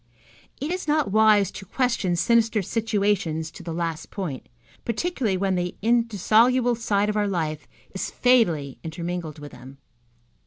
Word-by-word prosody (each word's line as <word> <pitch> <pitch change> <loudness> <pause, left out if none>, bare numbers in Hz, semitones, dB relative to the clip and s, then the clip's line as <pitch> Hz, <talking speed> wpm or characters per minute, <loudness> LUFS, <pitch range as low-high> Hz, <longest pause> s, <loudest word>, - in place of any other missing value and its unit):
It 295 +4 -3
is 365 -2 -4
not 300 -7 +1
wise 215 -2 +4
to - - -9
question 215 -4 0
sinister 225 +2 +2
situations 200 -7 -1
to 175 - -11
the 170 -1 -6
last 165 -1 -3
point, 170 - -6 0.3
particularly 235 - -1
when 195 0 0
the 180 -1 -2
indissoluble 235 +2 +3
side 210 -3 0
of 210 - -1
our 210 -1 +1
life 155 -6 -3 0.3
is 190 - -3
fatally 175 - +2
intermingled 170 -1 -5
with 145 -1 -10
them. 130 +2 -13
200 Hz, 145 wpm, -24 LUFS, 170-230 Hz, 0.3 s, wise